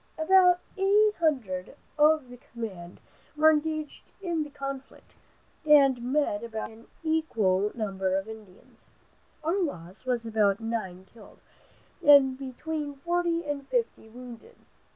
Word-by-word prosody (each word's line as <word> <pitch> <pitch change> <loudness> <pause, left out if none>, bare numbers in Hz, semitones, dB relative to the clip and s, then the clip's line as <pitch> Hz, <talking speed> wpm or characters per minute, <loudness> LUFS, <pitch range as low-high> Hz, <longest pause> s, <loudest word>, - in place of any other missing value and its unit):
About 360 +2 +5 0.2
eight 415 +2 +4
hundred 245 - -1 0.2
of 300 -3 +3
the 245 - -11
command 205 -8 -9 0.4
were 315 +1 +6
engaged 310 0 -3
in 345 -4 -2
the 300 - -4
conflict, 275 -1 -8 0.5
and 280 -5 +5
met 250 -4 0
about 225 -1 -5
an 225 +1 -16 0.2
equal 215 - +1
number 195 -4 -2
of 195 +2 -4
Indians. 215 -4 -14 0.5
Our 345 +6 0
loss 185 - -5
was 245 -3 -2
about 215 -3 +1
nine 215 -5 -4
killed 215 +1 -17 0.6
and 280 -2 +7
between 285 +3 -5
forty 340 +2 -1
and 285 -2 -4
fifty 465 - -2
wounded. 245 - -12
270 Hz, 125 wpm, -27 LUFS, 220-315 Hz, 0.6 s, and